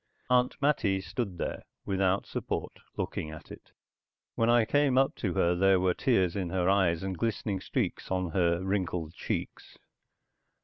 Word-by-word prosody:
Aunt 125 0 +3
Mattie 125 -9 +2
stood 100 -2 -4
there, - - -3 0.2
without 95 0 +1
support, - - -4 0.2
looking 80 - -3
at 80 0 -11
it. - - -12 0.6
When 115 0 +1
I 120 -1 +5
came 145 +1 +2
up 135 0 +4
to 95 -6 -2
her 85 +1 +3
there 95 +1 +4
were 90 0 +2
tears 95 -10 +1
in 95 -3 -2
her 90 0 0
eyes 95 -3 +2
and 95 -1 -3
glistening 105 0 -2
streaks - - -2
on 90 -2 -1
her 85 0 +1
wrinkled 90 -4 -2
cheeks. - - -5
95 Hz, 160 wpm, -29 LUFS, 90-115 Hz, 0.6 s, I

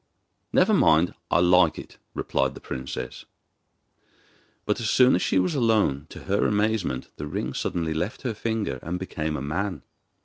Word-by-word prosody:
'Never - - +4
mind, 80 +3 +4 0.2
I 85 - +3
like 90 -2 +4
it,' - - -10 0.2
replied - - 0
the - - -9
princess. 65 +1 -6 1.4
But 105 - 0
as 115 -3 -1
soon 125 0 +5
as 90 - +2
she - - +1
was 90 +7 +2
alone, 110 - +2
to - - -10
her 100 +1 +1
amazement, 105 -10 0
the 75 - -5
ring - - -3
suddenly 80 -2 -2
left 90 +9 -3
her 125 -4 -1
finger 110 - -2
and 85 +2 -3
became 80 -4 -3
a 65 - -5
man. 85 +2 -3
90 Hz, 165 wpm, -25 LUFS, 80-105 Hz, 1.4 s, soon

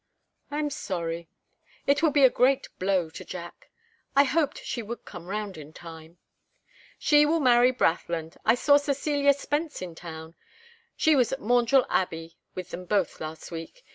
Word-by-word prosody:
"I 290 - -4
am 300 -1 -1
sorry. 170 - -4 0.6
It 285 +2 +3
will 325 - +4
be 290 -1 +3
a 260 - +9
great 260 +2 +2
blow 185 -4 +1
to - - -9
Jack. 175 -1 -9 0.5
I 280 - +7
hoped 295 +1 0
she 240 - -3
would 230 +2 -7
come 175 -2 -10
round 205 -3 -4
in 150 +1 -11
time." 165 0 -12 0.8
"She 295 -2 +5
will 320 +2 +2
marry 250 -2 +5
Brathland. 165 -7 -1
I 225 - +4
saw 285 +3 +5
Cecilia 285 0 +2
Spence 295 +2 -3
in 180 -2 -6
town. 160 -1 -9 0.6
She 315 -1 +4
was 250 -4 +3
at 270 - -2
Maundrell 245 +3 +3
Abbey 165 -5 -2 0.2
with 185 0 -6
them 180 +1 -6
both 195 -1 0
last 155 +2 -7
week. 165 - -8
220 Hz, 170 wpm, -27 LUFS, 170-280 Hz, 0.8 s, a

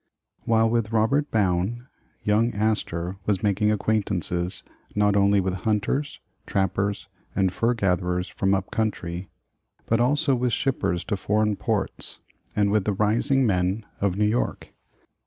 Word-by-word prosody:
WHILE 115 0 +4
with 115 -1 0
Robert 115 +7 +2
Bowne, 100 +3 0 0.4
young 110 +2 +2
Astor 100 -4 -1
was 100 -3 +1
making 105 +1 +2
acquaintance 95 -4 -1 0.3
not 105 -1 +3
only 100 0 +4
with 95 -1 0
hunters, 110 +9 -1 0.3
trappers, 100 +1 -1 0.3
and 95 -2 +2
fur 115 +4 +1
gatherers 90 -3 0
from 95 0 +1
up 95 0 -3
country, 90 -5 -2 0.6
but 115 - +1
also 135 +3 +2
with 125 -1 0
shippers 95 -10 0
to 105 - -1
foreign 105 +2 +1
ports, - - -2 0.4
and 100 -1 +2
with 105 -2 +2
the 105 - +1
rising 115 +7 +2
men 95 +1 0
of 100 -2 0
New 105 - +3
York. 110 +4 -1
105 Hz, 140 wpm, -25 LUFS, 95-110 Hz, 0.6 s, WHILE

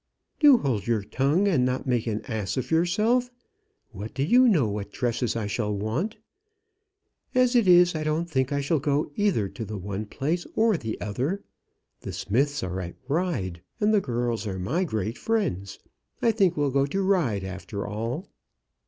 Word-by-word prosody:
"Do 290 -4 +8
hold 120 - -1
your 115 -3 +1
tongue, 145 - +1
and 160 -10 +3
not 130 +2 -1
make 125 -3 0
an 110 -1 -2
ass 105 -4 -3
of 130 - -3
yourself. 215 +10 +2 0.6
What 105 0 -8
do 135 - 0
you 250 - +5
know 160 - +4
what 100 -1 -4
dresses 120 -1 -1
I 115 -2 -2
shall 105 +1 -1
want? 110 - -2 1.2
As 255 0 +4
it 235 -5 +4
is, 180 0 +6
I 155 -1 -2
don't 155 +2 0
think 130 -5 0
I 140 0 0
shall 150 +2 +1
go 145 +1 0
either 195 - +1
to 115 - -6
the 105 0 -5
one 100 +2 -5
place 155 +9 -2
or 220 -1 +3
the 115 -9 -4
other. 130 - -2 0.6
The - - -7
Smiths 140 +5 0
are 95 0 -3
at 85 -1 -7
Ryde, 135 - -1 0.2
and 210 +1 +3
the 210 - +4
girls 120 - -2
are 95 -2 -3
my 135 - 0
great 110 - -3
friends. 170 - -1 0.4
I 230 - +3
think 195 -6 +2
we'll 145 -2 +1
go 140 +1 +2
to 195 +7 -1
Ryde, 160 - +1
after 95 +2 -5
all." 115 - -4
135 Hz, 180 wpm, -26 LUFS, 105-180 Hz, 1.2 s, Do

